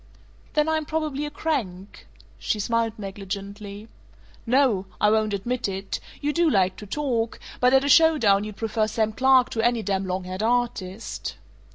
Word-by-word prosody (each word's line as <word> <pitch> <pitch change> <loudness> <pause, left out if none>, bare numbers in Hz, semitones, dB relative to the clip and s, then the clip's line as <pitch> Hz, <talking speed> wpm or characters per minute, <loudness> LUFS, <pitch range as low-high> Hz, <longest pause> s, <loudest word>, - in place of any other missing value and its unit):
"Then 300 0 +2
I'm 315 -1 +1
probably 300 -2 -2
a - - -5
crank." 225 - -4 0.3
She 215 - -1
smiled 230 +1 0
negligently. 200 +1 -7 0.6
"No. 235 -7 +3
I 210 - +4
won't 215 -1 +2
admit 240 +5 -2
it. 195 0 -4 0.2
You 295 0 0
do 335 0 +3
like 190 -7 +2
to 210 - -9
talk, 235 -2 -1 0.2
but 250 0 +4
at 265 0 +5
a - - 0
show 320 +2 +6
down 200 -6 +3
you'd 210 -1 -7
prefer 220 -1 0
Sam 220 0 0
Clark 260 +1 +4
to 225 - -1
any 235 -1 +1
damn 195 -1 -1
long 185 0 -2
haired 185 +2 -5
artist." 230 -4 -2
225 Hz, 170 wpm, -24 LUFS, 200-265 Hz, 0.6 s, show